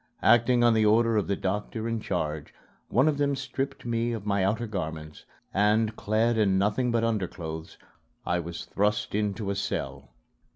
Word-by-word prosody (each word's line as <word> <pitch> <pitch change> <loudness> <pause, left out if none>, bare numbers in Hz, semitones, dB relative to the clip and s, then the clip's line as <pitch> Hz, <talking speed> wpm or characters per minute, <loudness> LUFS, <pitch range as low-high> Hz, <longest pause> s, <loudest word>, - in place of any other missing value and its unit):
Acting 120 +1 +5
on 120 -1 +5
the 110 -1 +3
order 115 +2 +4
of 105 - +1
the 100 - +1
doctor 105 +4 -3
in 115 -1 -1
charge, 75 -7 -3 0.3
one 130 +7 +3
of 145 -2 +1
them 140 -1 +2
stripped 135 0 -4
me 120 0 0
of 110 -3 -5
my 100 -2 +1
outer 110 +5 0
garments; 80 -7 -6 0.3
and, 105 +2 +2
clad 110 +2 +1
in 95 -3 +3
nothing 105 +6 +1
but 115 -1 +1
underclothes, 85 -7 -3 0.5
I 90 - +1
was 85 0 -6
thrust 105 +1 0
into 105 0 -1
a - - -2
cell. 70 -8 -4
105 Hz, 170 wpm, -27 LUFS, 95-115 Hz, 0.5 s, Acting